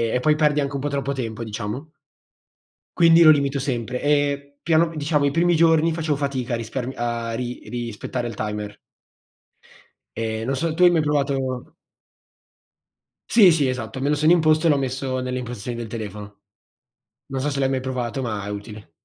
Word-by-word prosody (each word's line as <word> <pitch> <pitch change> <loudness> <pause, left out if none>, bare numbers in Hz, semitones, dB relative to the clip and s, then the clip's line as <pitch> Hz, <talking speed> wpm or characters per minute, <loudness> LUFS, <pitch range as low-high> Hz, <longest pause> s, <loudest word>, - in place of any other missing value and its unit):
e - - +2
poi 150 +1 +3
perdi 150 -1 +2
anche 140 0 -3
un 140 - -2
po' 145 - -2
troppo 140 0 -2
tempo 115 -3 -4
diciamo. 110 +7 -5 1.1
Quindi 170 0 +6
lo 155 - +8
limito 140 -2 +3
sempre, 125 -2 -3
e 145 -1 0
piano 165 0 +2
diciamo 150 -1 +1
i 140 - +2
primi 170 +2 +2
giorni 165 0 +4
facevo 155 -3 -1
fatica 130 -4 -2
a - - +1
rispar 120 +2 -4
a 120 -1 -2
ri 125 +1 -4
rispettare 120 +1 -4
il 115 - -6
timer. 105 -1 -4 1.4
Ehm, 110 0 -3
non 135 +1 -1
so, 160 +3 -1
tu 180 +2 +2
hai 175 - +9
mai 165 -2 +3
provato 135 -4 -1 1.6
Sì, 200 -7 +7
sì 150 -4 +2
esatto, 130 +1 -4
me 140 - 0
lo 150 - +3
sono 155 +3 +3
imposto, 155 -1 +4
e - - +5
l'ho 145 - +3
messo 130 0 -2
nelle 125 0 -3
impostazioni 120 -1 -5
del 120 - -4
telefono. 105 -2 -8 0.9
Non 135 0 -4
so 145 - -1
se 140 -1 -2
l'hai 135 - +2
mai 135 - 0
provato, 130 0 -3
ma 105 -5 -3
è 105 - -5
utile. 105 -2 -8
135 Hz, 185 wpm, -22 LUFS, 120-150 Hz, 1.6 s, hai